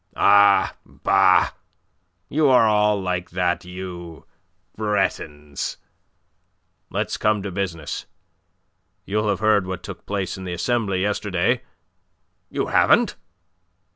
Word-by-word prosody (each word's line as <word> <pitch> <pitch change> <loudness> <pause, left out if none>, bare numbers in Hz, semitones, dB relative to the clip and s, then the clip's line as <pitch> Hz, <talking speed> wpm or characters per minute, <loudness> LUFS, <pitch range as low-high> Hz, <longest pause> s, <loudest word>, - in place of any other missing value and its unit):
"Ah, 100 0 +5
bah! - - +3 0.8
You 150 -1 +2
are 125 -3 +5
all 105 -1 +3
like 90 -1 -3
that, 90 -1 -1
you 90 -2 -8 0.5
Bretons. 75 -9 -2 1.1
Let's - - -2
come 105 -2 +1
to 100 - -4
business. 85 -5 -4 1.0
You'll 105 +1 -1
have 100 0 -1
heard 105 -3 +3
what 95 -1 -5
took - - -9
place 100 -3 -3
in - - -7
the 90 -1 -4
Assembly 100 0 0
yesterday? 105 +3 0 0.9
You - - -2
haven't? - - +3
100 Hz, 105 wpm, -22 LUFS, 90-105 Hz, 1.1 s, Ah